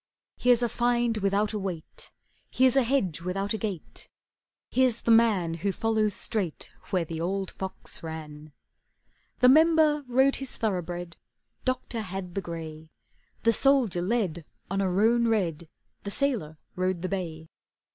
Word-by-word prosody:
Here's 245 Hz, -1 st, +3 dB
a -, -, +3 dB
find 240 Hz, 0 st, +1 dB
without 200 Hz, +1 st, +1 dB
a 210 Hz, -, -2 dB
wait! 180 Hz, -5 st, -6 dB, 0.4 s
Here's 260 Hz, 0 st, +3 dB
a 270 Hz, -, +5 dB
hedge 230 Hz, -, 0 dB
without 195 Hz, +4 st, -2 dB
a -, -, -1 dB
gate! 195 Hz, -6 st, -6 dB, 0.6 s
Here's 255 Hz, -3 st, +2 dB
the 230 Hz, -, +2 dB
man 215 Hz, -7 st, +4 dB
who 170 Hz, +5 st, -1 dB
follows 215 Hz, 0 st, +1 dB
straight, 190 Hz, -8 st, -1 dB, 0.2 s
Where 180 Hz, -3 st, 0 dB
the 165 Hz, 0 st, -5 dB
old 190 Hz, +2 st, -2 dB
fox 190 Hz, 0 st, -7 dB
ran. 155 Hz, -2 st, -8 dB, 0.9 s
The 250 Hz, -, +7 dB
Member 310 Hz, 0 st, +5 dB
rode 265 Hz, +3 st, +3 dB
his 270 Hz, -2 st, -6 dB
thoroughbred, 175 Hz, -5 st, -3 dB, 0.5 s
Doctor 255 Hz, -3 st, -2 dB
had 190 Hz, -3 st, -6 dB
the 195 Hz, -, -2 dB
gray, 160 Hz, -2 st, -7 dB, 0.5 s
The 230 Hz, -, +4 dB
Soldier 255 Hz, -9 st, +3 dB
led 180 Hz, -5 st, -1 dB, 0.3 s
on 195 Hz, 0 st, 0 dB
a 190 Hz, -, +1 dB
roan 225 Hz, +6 st, +3 dB
red, 170 Hz, -8 st, -1 dB, 0.3 s
The 200 Hz, -, -5 dB
Sailor 205 Hz, -, -1 dB, 0.2 s
rode 185 Hz, -1 st, -1 dB
the 185 Hz, -, -1 dB
bay. 165 Hz, -5 st, -4 dB
195 Hz, 145 wpm, -27 LUFS, 175-235 Hz, 0.9 s, The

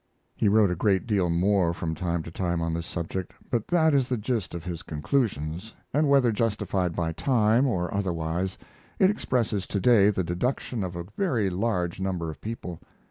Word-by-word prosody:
He 105 Hz, -, +2 dB
wrote 105 Hz, -2 st, +4 dB
a -, -, 0 dB
great 95 Hz, +1 st, +2 dB
deal 100 Hz, -6 st, +1 dB
more 90 Hz, 0 st, +2 dB
from 80 Hz, -2 st, -3 dB
time 85 Hz, -1 st, -2 dB
to 85 Hz, -, -8 dB
time 85 Hz, -1 st, -1 dB
on 85 Hz, 0 st, -1 dB
this 85 Hz, 0 st, -3 dB
subject; 90 Hz, +2 st, -4 dB, 0.2 s
but 115 Hz, -3 st, 0 dB
that 160 Hz, -3 st, +3 dB
is 135 Hz, -3 st, +3 dB
the 125 Hz, -, -1 dB
gist 110 Hz, -4 st, -2 dB
of 85 Hz, -, -6 dB
his 85 Hz, -2 st, -5 dB
conclusions, 85 Hz, -, -2 dB, 0.2 s
and 150 Hz, +1 st, +3 dB
whether 135 Hz, -4 st, +5 dB
justified 100 Hz, -5 st, -1 dB
by 85 Hz, -2 st, -1 dB
time, 115 Hz, -, +3 dB
or 90 Hz, -8 st, -1 dB
otherwise, 90 Hz, -1 st, -2 dB, 0.4 s
it 190 Hz, +1 st, +5 dB
expresses 115 Hz, -, -1 dB
today 105 Hz, 0 st, +4 dB
the 95 Hz, -3 st, 0 dB
deduction 110 Hz, +5 st, -2 dB
of 90 Hz, -1 st, -4 dB
a 85 Hz, -, -4 dB
very 120 Hz, -, +1 dB
large 90 Hz, -3 st, -1 dB
number 90 Hz, -4 st, -2 dB
of -, -, -13 dB
people. 105 Hz, -7 st, -6 dB
95 Hz, 185 wpm, -26 LUFS, 85-115 Hz, 0.4 s, whether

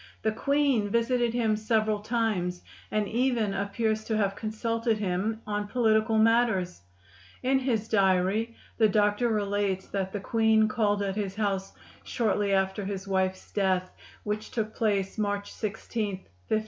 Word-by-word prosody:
The 220 Hz, -, +2 dB
queen 275 Hz, -3 st, +1 dB
visited 235 Hz, +2 st, +1 dB
him 225 Hz, -3 st, +2 dB
several 215 Hz, 0 st, +1 dB
times, 205 Hz, -5 st, -1 dB, 0.3 s
and 210 Hz, -1 st, 0 dB
even 235 Hz, -2 st, +1 dB
appears 215 Hz, +2 st, -1 dB
to 220 Hz, -, 0 dB
have 200 Hz, -2 st, +1 dB
consulted 230 Hz, +1 st, -1 dB
him 205 Hz, +2 st, -1 dB
on 210 Hz, -1 st, -2 dB
political 220 Hz, -1 st, +2 dB
matters. 220 Hz, -, +2 dB, 0.6 s
In 265 Hz, +1 st, +3 dB
his 230 Hz, -5 st, -1 dB
diary 200 Hz, +2 st, +2 dB, 0.2 s
the 220 Hz, -1 st, +5 dB
doctor 210 Hz, +3 st, +2 dB
relates 205 Hz, -3 st, 0 dB
that 190 Hz, -1 st, -2 dB
the 205 Hz, -, -3 dB
queen 220 Hz, +1 st, +3 dB
called 210 Hz, -3 st, +1 dB
at 195 Hz, -1 st, -2 dB
his 200 Hz, -2 st, -3 dB
house 195 Hz, -3 st, -1 dB, 0.3 s
shortly 210 Hz, -4 st, 0 dB
after 190 Hz, +1 st, +1 dB
his 195 Hz, 0 st, -5 dB
wife's 190 Hz, -1 st, -1 dB
death, 185 Hz, -2 st, 0 dB, 0.3 s
which 210 Hz, +1 st, -3 dB
took 220 Hz, -2 st, -3 dB
place 200 Hz, -2 st, 0 dB
March 205 Hz, -1 st, -2 dB
16, 215 Hz, 0 st, -3 dB, 0.4 s
1575. 220 Hz, -, +3 dB
215 Hz, 145 wpm, -28 LUFS, 195-225 Hz, 0.6 s, the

